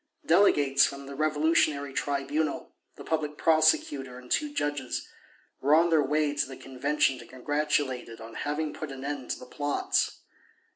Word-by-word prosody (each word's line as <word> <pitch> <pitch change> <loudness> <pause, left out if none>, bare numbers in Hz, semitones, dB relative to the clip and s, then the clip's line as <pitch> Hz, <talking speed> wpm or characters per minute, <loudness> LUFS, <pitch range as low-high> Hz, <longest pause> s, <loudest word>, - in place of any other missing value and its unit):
Delegates 145 -6 +4
from 140 0 -1
the 140 - -8
Revolutionary 150 -1 +1
Tribunal, 145 +3 -2 0.2
the - - -10
Public 150 -2 -2
Prosecutor 150 -5 +2
and 125 0 -13
two 300 -1 +1
judges, 145 - -2 0.5
were 145 +3 +4
on 170 +1 +4
their 160 -2 +5
way 150 +1 +1
to 145 - 0
the 135 - -9
Convention 135 0 0
to 120 - -12
congratulate 145 -1 -1
it 115 - -10
on 115 0 -10
having 150 +3 -2
put 155 -3 -6
an 135 0 -7
end 140 -3 -4
to - - -2
the - - -11
plots. 145 +3 -1
145 Hz, 160 wpm, -28 LUFS, 135-155 Hz, 0.5 s, their